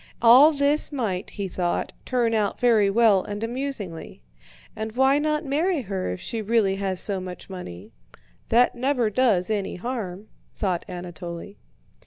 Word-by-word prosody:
All 250 +7 +8
this 290 +1 +1
might, 215 -10 -2
he 200 -1 -4
thought, 175 -1 -2
turn 240 -3 +1
out 210 -2 0
very 225 -5 +4
well 210 -2 +4
and 205 +1 -5
amusingly. 230 - -5 0.5
"And 220 0 -5
why 265 +3 +3
not 305 +1 -1
marry 310 +4 0
her 195 - -3
if 90 - -4
she 230 - -4
really 210 -3 +1
has 190 -2 -2
so 200 -2 0
much 185 +1 -8
money? 90 - -9 0.6
That 245 +2 +4
never 245 -3 0
does 215 -5 +2
any 205 -2 -2
harm," 210 -2 -5 0.3
thought 185 -5 -1
Anatole. 175 +1 -7
215 Hz, 150 wpm, -24 LUFS, 185-255 Hz, 0.6 s, All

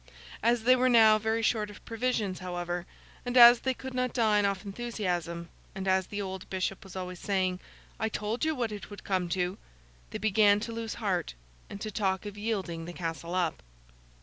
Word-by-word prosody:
As 235 -1 +2
they 255 +2 +6
were 255 0 +3
now 220 -3 +7
very 220 +1 0
short 215 -2 +1
of 205 - -13
provisions, 225 -5 -1
however, 175 -1 -4 0.4
and 245 0 -1
as 240 0 +10
they 260 -1 -1
could 265 +1 -7
not 255 -1 -1
dine 210 -4 +3
off 200 0 -3
enthusiasm, 180 -6 -3 0.3
and 190 0 -4
as 190 -1 +2
the 205 - -5
old 190 -2 -5
bishop 190 0 -2
was 190 -1 -12
always 180 -1 -5
saying, 185 -3 0 0.4
'I 220 - 0
told 215 +4 -3
you 315 0 +1
what 235 -4 -1
it 205 -1 -7
would 205 - -10
come 185 -3 -1
to!' 180 +2 -1 0.5
they - - -4
began 205 0 +4
to 230 - -4
lose 225 -1 -4
heart, 190 - -2 0.3
and 200 - -7
to 215 - -4
talk 190 -2 -1
of 205 -1 -6
yielding 195 -6 -3
the 175 - -7
castle 170 0 -4
up. 175 -4 0
205 Hz, 195 wpm, -29 LUFS, 185-225 Hz, 0.5 s, as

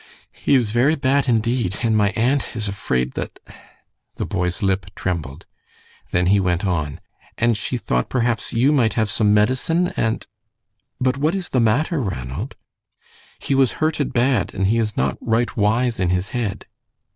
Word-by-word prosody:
"He - - +1
is 120 -5 +2
very 130 +7 +3
bad 140 -1 +1
indeed, 115 -4 +1
and 115 -2 +2
my 105 -2 +3
aunt 130 +4 0
is 110 -2 -3
afraid 65 -11 -1
that - - -5 0.4
" - - -45
The - - -3
boy's 90 -1 -2
lip 95 -1 0
trembled. 80 -4 -4 0.6
Then 90 0 +1
he 100 +3 +4
went 90 0 0
on: 80 -4 -1 0.4
"And 120 -1 +2
she 115 +4 -2
thought 60 - -1
perhaps 120 -4 0
you 125 +5 +3
might 120 -8 +2
have 110 -2 +1
some 105 -2 +2
medicine, 130 +12 +2
and 110 0 -1 0.4
" - - -57 0.3
"But 130 +1 +1
what 155 +6 +1
is 190 -2 -3
the 130 - +1
matter, 140 - +1
Ranald?" 65 - -4 0.8
"He - - -2
was 135 -2 +3
hurted 155 -2 -1
bad 120 -4 +1
and 95 - 0
he 110 +4 +2
is 105 -3 -2
not 65 0 0
right 115 +2 0
wise 115 +3 +1
in 90 -2 +1
his 90 +3 0
head." 110 -5 -3
110 Hz, 175 wpm, -21 LUFS, 95-130 Hz, 0.8 s, he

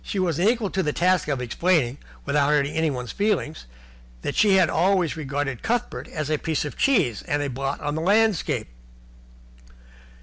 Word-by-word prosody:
She - - -5
was 170 -4 0
unequal 220 +1 +1
to 190 - 0
the 150 -4 -1
task 180 0 +2
of 135 -4 -1
explaining, 145 0 +1 0.3
without 140 0 +2
hurting 145 -1 +1
anyone's 140 -7 -1
feelings, 200 -7 -1 0.6
that - - -2
she 205 -2 +4
had 185 -3 +5
always 180 0 +1
regarded 140 -4 -3
Cuthbert 240 +1 -2
as 155 -2 -4
a 155 - +1
piece 160 -2 -1
of 145 - -6
cheese 175 - +2
and 145 0 0
a 140 - -3
blot 135 +2 -3
on 145 -1 -2
the 160 - -2
landscape. 210 +1 +2
160 Hz, 170 wpm, -24 LUFS, 145-190 Hz, 0.6 s, had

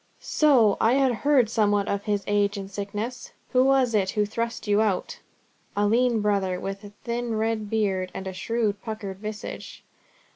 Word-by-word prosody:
"So! 250 -9 +3
I 225 - +4
had 270 -1 +3
heard 265 0 +3
somewhat 205 -2 +1
of 200 0 -2
his 205 -2 0
age 205 0 +1
and 195 0 -7
sickness. 205 +5 -5 0.2
Who 255 -1 +4
was 265 -3 +3
it 195 -3 +2
who 210 +1 +1
thrust 230 +3 -4
you 205 0 +3
out?" 205 -4 -1 0.6
"A 205 - +3
lean 235 +1 +2
brother 195 -3 0
with 195 +2 -5
a 205 - -9
thin 235 -1 -2
red 220 -1 -1
beard, 195 -4 0
and 190 - -7
a 190 - -4
shrewd, 215 0 -1
puckered 210 -4 -6
visage." 215 +1 -7
210 Hz, 175 wpm, -25 LUFS, 200-235 Hz, 0.6 s, I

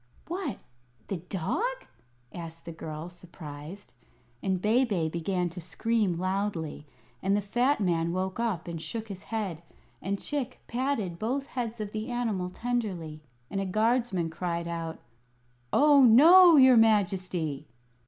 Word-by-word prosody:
"What, 360 +4 -3 0.5
the 195 - -1
dog?" 300 - -3 0.5
asked 165 -1 -8
the 170 - -6
girl, 155 0 -7
surprised. 175 0 -10 0.5
And 190 -1 0
Bebe 210 -5 +2
began 175 +2 -1
to 175 +2 -8
scream 195 +2 0
loudly; 185 -5 -2 0.3
and 195 +2 +2
the - - +2
fat 240 +8 +1
man 170 -4 +1
woke 185 +3 -2
up 215 -8 -1
and 165 -2 -5
shook 225 +4 -5
his 190 -2 -7
head, 200 -8 -4 0.4
and 200 +2 -2
Chick 285 -4 -3
patted 235 -9 -2
both 265 +5 -1
heads 240 -4 -4
of 210 -1 -4
the 215 +3 -4
animal 225 -7 -1
tenderly, 185 -9 -3 0.3
and 195 - -1
a - - -2
guardsman 215 -4 +1
cried 170 0 -3
out: 165 -1 -4 0.7
"Oh, 290 -1 +6
no, 330 +9 +8
your 260 -3 +7
Majesty!" 185 -9 +1
195 Hz, 135 wpm, -28 LUFS, 170-235 Hz, 0.7 s, no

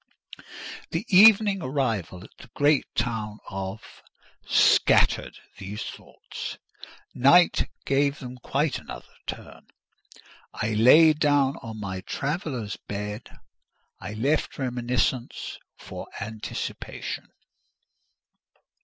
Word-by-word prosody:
The 165 +7 -3
evening 200 0 +7
arrival 115 - -2
at - - -16
the 130 - -14
great 145 0 +3
town 110 -2 -2
of 95 +2 -7 0.2
—— - - -29
scattered - - +3 0.2
these 100 +3 -6
thoughts; - - -8 0.6
night 170 +8 +4 0.2
gave 140 +1 +1
them 125 -3 -9
quite 140 +3 -1
another - - -11
turn: - - -8 1.0
laid 130 +9 +6
down 145 -2 +2
on 110 -1 -8
my 95 -2 -5
traveller's 135 - -4
bed, 105 +3 -5 0.7
I 105 - -7
left 140 +8 0
reminiscence 125 -1 -2 0.2
for - - -9
anticipation. 110 +1 -6
125 Hz, 90 wpm, -25 LUFS, 105-145 Hz, 1.0 s, evening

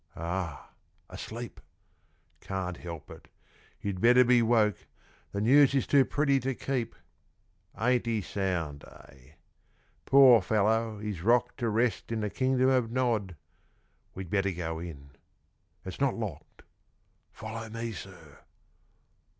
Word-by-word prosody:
Ah! 85 -2 -5 0.4
asleep. 120 +2 -7 0.8
Can't 90 -2 -4
help 85 -4 -9
it - - -13 0.5
you'd 100 -2 -4
better 125 +2 +6
be 125 -1 +4
woke; 110 -3 +1 0.4
The 100 - -3
news 140 +5 +5
is 135 - +2
too 140 -2 +4
pretty 140 -2 +1
to 135 0 -2
keep. 125 -4 -3 0.8
Ain't 125 +1 +1
he 115 -2 0
sound, 85 -8 -3
eh? 70 0 -17 0.7
Poor 130 -5 +7
fellow, 110 +2 +1
he's 105 -4 -5
rocked 120 +4 +2
To 120 -2 0
rest 115 +2 0
in 115 -1 -1
the 105 -1 -2
Kingdom 130 0 +2
of 125 -3 +2
Nod. 115 -7 -1 0.8
We'd 95 -2 -7
better 100 -1 +1
go 80 -2 -4
in. 70 -5 -9 0.7
It's 95 +7 -7
not 140 -2 +2
locked. 105 -10 -7 0.7
Follow 110 +1 -7
me, 115 +1 -5
sir. 95 - -11
110 Hz, 125 wpm, -29 LUFS, 95-125 Hz, 0.8 s, Poor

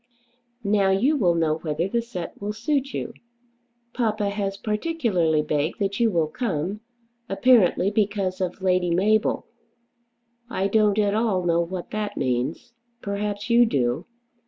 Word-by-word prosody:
Now 200 -1 +2
you 235 +11 +3
will 180 -11 +2
know 160 -1 +1
whether 160 +2 -2
the 235 +4 0
set 185 -8 -7
will 205 +1 -3
suit 275 +5 -1
you. - - -4 0.8
Papa 215 -4 0
has 200 -1 -3
particularly 210 - 0
begged 150 +1 -1
that 200 -1 -2
you 235 -1 +4
will 170 -6 +1
come, 185 - -3 0.5
apparently 200 -3 +4
because 200 -3 0
of 185 +1 -3
Lady 180 -1 +2
Mabel. 205 +5 +2 1.0
I 195 -5 0
don't 210 -1 +3
at 205 -1 +2
all 210 -4 +1
know 170 0 +3
what 175 +1 -5
that 210 -1 -3
means. 135 - -2 0.3
Perhaps 205 +2 -3
you 240 0 +6
do. 130 - 0
200 Hz, 140 wpm, -24 LUFS, 175-215 Hz, 1.0 s, you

